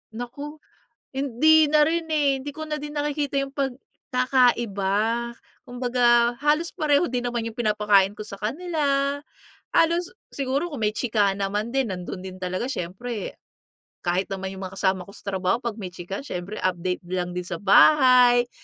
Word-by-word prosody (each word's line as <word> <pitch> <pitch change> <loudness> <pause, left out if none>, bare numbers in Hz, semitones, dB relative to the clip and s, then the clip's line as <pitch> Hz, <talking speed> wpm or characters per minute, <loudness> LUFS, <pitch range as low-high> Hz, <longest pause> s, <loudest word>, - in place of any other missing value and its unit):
Naku, 255 +6 -6 0.6
hindi 280 +4 +4
na 300 0 +4
rin, 325 +2 +1
eh. 290 -3 +2
Hindi 285 +2 -7
ko 315 - -7
na 300 0 -2
din 295 0 -7
nakikita 290 -1 -1
yung 275 - -5
pagkakaiba. 240 -5 0 0.3
Kumbaga, 245 -1 +2
halos 305 +3 +2
pareho 300 +2 +2
din 245 -1 -2
naman 240 -1 -2
yung 230 +2 -7
pinapakain 210 -3 +3
ko 215 - -7
sa 200 -2 -9
kanila. 280 - -1 0.6
Halos 340 +2 +2 0.2
siguro 280 +5 -1
kung 275 -7 -6
may 210 - +3
chikahan 205 -5 +1
naman 205 +3 -2
din, 265 -4 0
nando'n 185 0 -6
din 185 0 -8
talaga, 185 +5 -2
siyempre. 225 -1 -5 0.6
Kahit 180 +2 -1
naman 190 0 -4
yung 190 0 -7
mga 185 - -8
kasama 190 -2 +1
ko 200 - -14
sa 205 - -7
trabaho 190 +4 0
'pag 235 -3 -4
may 185 -4 -7
chikahan, 190 +8 -6
siyempre 185 -2 -5
update 180 0 -2
lang 180 0 -3
din 180 - -3
sa 170 -2 -6
bahay, 245 +2 +6
240 Hz, 160 wpm, -24 LUFS, 195-280 Hz, 0.6 s, bahay